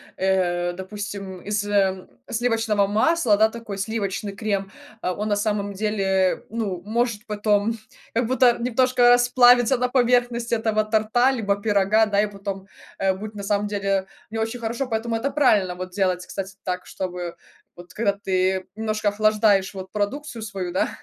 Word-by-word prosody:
э, 175 -2 +1
допустим, 195 0 -7
из, 205 0 -2
ам, 190 -2 +1 0.2
сливочного 225 -3 +1
масла, 225 +3 +3
да, 220 +1 +5
такой 225 -3 -7
сливочный 200 -1 -3
крем. 195 -2 -2 0.3
А 180 - -1
он, 210 +3 -3
на 205 - +1
самом 205 -1 -1
деле, 195 -2 0
ну, 205 -6 -3
может 230 0 -1
потом 210 0 +1 0.4
как 230 0 +1
будто 255 -1 +4
немножко 250 0 +3
расплавиться 245 0 +5
на 250 +1 0
поверхность 245 -2 +1
этого 220 -1 +1
торта, 220 +4 +2
либо 205 -6 0
пирога, 210 +1 +3
да, 205 -1 +2
и 210 - +1
потом, 195 -1 -6 0.3
а, 195 -1 +1
будет, 210 +3 -8
на 200 - -6
самом 205 +1 0
деле, 195 -2 -1 0.2
не 225 - -4
очень 225 +2 -2
хорошо. 235 +4 -2
Поэтому 225 0 -2
это 270 +5 -2
правильно 210 -11 +3
вот 185 0 -6
делать, 185 -2 0
кстати, 195 0 -6
так, 180 -1 -3
чтобы, 180 -2 -5 0.4
вот 175 +1 -13
когда 210 -2 +1
ты 190 -1 0
немножко 215 -1 -2
охлаждаешь 210 -2 +2
вот 190 -1 -8
продукцию 235 +5 -3
свою, 195 -4 -4
да, 185 - +1
210 Hz, 160 wpm, -23 LUFS, 195-230 Hz, 0.4 s, да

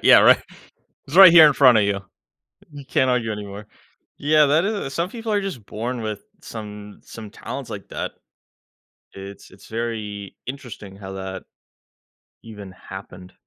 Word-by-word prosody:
Yeah, - - +8
right. - - +6 0.6
"It's 145 - -5
right 190 -3 +10
here 165 -2 +10
in 150 - +5
front 130 -4 +6
of 105 - +3
you. 100 -1 -1 0.7
You 145 -1 -10
can't 130 0 +1
argue 120 -3 0
anymore." 105 0 -8 0.5
Yeah, 150 +1 +4
that 155 +5 +3
is 200 -10 -3
some 170 +5 -1
people 225 -1 -5
are 205 - +2
just 190 - -6
born 120 +3 -4
with 110 -1 -4 0.2
some 105 -6 -9
some 110 -2 -10
talents - - -8
like - - -8
that, - - -5 1.0
it's 100 +1 -11
it's - - -17
very 110 -3 -5
interesting 120 -7 -8
how 95 -1 -9
that 95 0 -7 1.0
even 105 -4 -11
happened. 95 -1 -11
115 Hz, 155 wpm, -22 LUFS, 100-145 Hz, 1.0 s, right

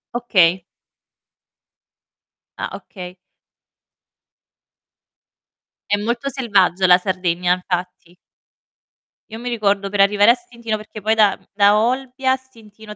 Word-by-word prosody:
Okay. 185 -7 +2 2.0
Ah, - - -5
okay. 180 -2 -11 2.7
È 205 - +4
molto 235 +6 -3
selvaggia 200 -8 +1
la 180 0 +7
Sardegna, 180 -1 -1
infatti. 180 -1 -5 1.2
Io 225 - -7
mi 245 +1 -5
ricordo 200 -4 0
per 205 0 -4
arrivare 205 +2 +5
a - - +4
Stintino 235 -11 -6
perché 215 0 -11
poi 220 +2 +1
da 210 -3 +3
mhmm, - - -30
da 205 0 +4
Olbia 255 +3 -1
a 260 - +3
Stintino 220 -5 -15
205 Hz, 110 wpm, -19 LUFS, 185-235 Hz, 2.7 s, la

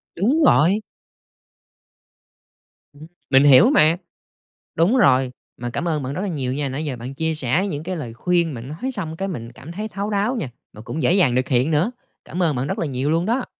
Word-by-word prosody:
Đúng 260 - +2
rồi. 195 - +4 2.1
Ừm, 150 +2 -13 0.2
mình 135 0 +5
hiểu 145 - +7
mà. 165 - +4 0.8
Đúng 185 +11 +3
rồi. 130 - +4 0.3
Mà 120 - -3
cảm 170 +8 -3
ơn 155 -4 -1
bạn 130 +2 -4
rất 180 - -3
là 205 - -2
nhiều 135 -8 -2
nha, 140 0 -2
nãy 145 +4 -4
giờ 135 -4 -3
bạn 125 +3 -7
chia 160 +3 -1
sẻ 150 +8 +1
những 150 -5 -4
cái 185 +1 -4
lời 125 -8 -6
khuyên 170 +4 0
mà 115 - -7
nói 155 - -5
xong 160 -7 -4
cái 195 - -2
mình 120 -11 -6
cảm 145 +7 -11
thấy 210 +5 -5
thấu 205 0 -4
đáo 210 +5 0
nha, 150 - -3 0.2
mà 105 - -11
cũng 155 +7 -5
dễ 125 - +4
dàng 160 -11 +3
nực 130 - +1
hiện 130 +4 +1
nữa. 160 +10 +1 0.3
Cảm 180 +1 -2
ơn 155 -4 +2
bạn 125 +2 -2
rất - - -3
là - - 0
nhiều 135 +1 -2
luôn 165 +2 +1
đó! 240 +5 0
155 Hz, 220 wpm, -21 LUFS, 130-185 Hz, 2.1 s, hiểu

